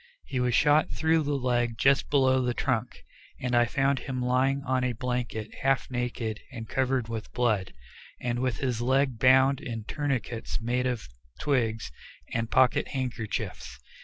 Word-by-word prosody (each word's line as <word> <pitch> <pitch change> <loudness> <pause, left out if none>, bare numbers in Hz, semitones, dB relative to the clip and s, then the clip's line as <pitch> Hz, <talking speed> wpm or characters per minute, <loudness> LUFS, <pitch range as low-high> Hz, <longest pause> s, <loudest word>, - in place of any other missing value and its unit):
He 130 - -3
was 125 -1 +1
shot 150 +4 +4
through 160 0 +2
the 145 -1 -1
leg 120 -3 0
just 135 +3 +3
below 130 -2 +3
the 125 -1 -1
trunk, 125 -2 -2 0.4
and 125 -1 -1
I 120 0 +5
found 135 +4 +1
him 130 -2 -4
lying 130 +2 +1
on 130 -2 0
a 125 -1 0
blanket 120 -2 -3
half 135 -1 +1
naked 120 -3 -3
and 115 -3 -7
covered 130 -1 0
with 115 -2 -5
blood, 110 -6 +1 0.5
and 120 -1 -2
with 130 -3 0
his 125 -4 -1
leg 130 -1 +1
bound 130 +2 +5
in 115 -4 -5
tourniquets 130 -3 -3
made 125 +2 0
of 125 -3 -3 0.3
twigs 115 - 0 0.4
and 115 -1 -1
pocket 130 -1 +3
handkerchiefs. 115 - -4
125 Hz, 160 wpm, -28 LUFS, 115-135 Hz, 0.5 s, I